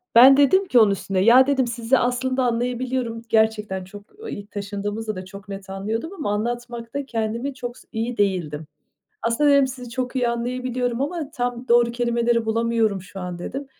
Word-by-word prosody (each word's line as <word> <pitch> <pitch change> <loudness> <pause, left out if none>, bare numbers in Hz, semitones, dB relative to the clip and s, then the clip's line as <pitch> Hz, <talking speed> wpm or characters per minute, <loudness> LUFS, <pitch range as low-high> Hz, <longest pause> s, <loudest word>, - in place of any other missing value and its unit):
Ben 265 +3 +9
dedim 330 +8 +4
ki 245 - +5
onun 215 -2 +6
üstüne: 195 -1 -2
"ya" 240 +7 +6
dedim 270 -3 +2
"Sizi 235 +2 +1
aslında 255 +1 0
anlayabiliyorum." 245 0 -1
Gerçekten 215 -4 +1
çok 200 +2 -11 0.3
İlk 205 +1 -8
taşındığımızda 205 +1 -4
da 185 - -7
çok 195 +2 -12
net 195 -1 -8
anlıyordum 220 - -3
ama 295 - -3
anlatmakta 240 +4 -4
kendimi 235 +3 -2
çok 245 -1 -7
s - - -18
iyi 230 +1 -3
değildim. 165 -7 -1 0.6
Aslında 235 +6 +2
dedim: 280 -1 +5
"Sizi 250 -2 -8
çok 255 +1 -3
iyi 245 -2 +2
anlayabiliyorum 245 0 -2
ama 300 +1 -3
tam 245 -1 -3
doğru 235 0 +5
kelimeleri 235 -1 +1
bulamıyorum 225 -3 +1
şu 190 +1 -10
an." 180 -1 -5
dedim. 270 +10 -5
235 Hz, 170 wpm, -23 LUFS, 210-255 Hz, 0.6 s, Ben